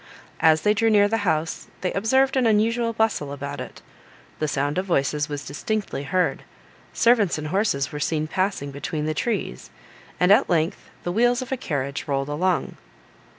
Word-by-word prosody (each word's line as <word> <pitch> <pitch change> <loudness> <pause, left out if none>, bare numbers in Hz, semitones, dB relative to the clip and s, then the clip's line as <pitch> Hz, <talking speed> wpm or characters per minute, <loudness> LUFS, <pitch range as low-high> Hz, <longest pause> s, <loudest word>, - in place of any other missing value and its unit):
As 160 -1 +4
they 210 - +4
drew 225 +2 +2
near 205 -1 +5
the 225 +2 0
house, 160 +1 -2
they 180 - -1
observed 265 +7 +2
an 255 -3 +3
unusual 230 +2 +2
bustle 220 -11 0
about 140 -1 -5
it; - - -10 0.6
the 155 - 0
sound 145 +3 -1
of 190 - -2
voices 145 -2 0
was 145 -1 -5
distinctly 205 +2 -3
heard, 185 +5 0 0.5
servants 225 -8 +3
and 155 0 -5
horses 165 -8 0
were 150 - -5
seen 155 +1 0
passing 180 -4 -2
between 150 +2 -4
the 155 - 0
trees, 185 - -3 0.5
and, 180 +2 +4
at 205 - +5
length, 165 -1 0
the 175 - -2
wheels 245 +5 +2
of 255 - -11
a - - +1
carriage 140 - -3
rolled 135 0 -1
along. 175 +4 -1
175 Hz, 175 wpm, -24 LUFS, 145-220 Hz, 0.6 s, near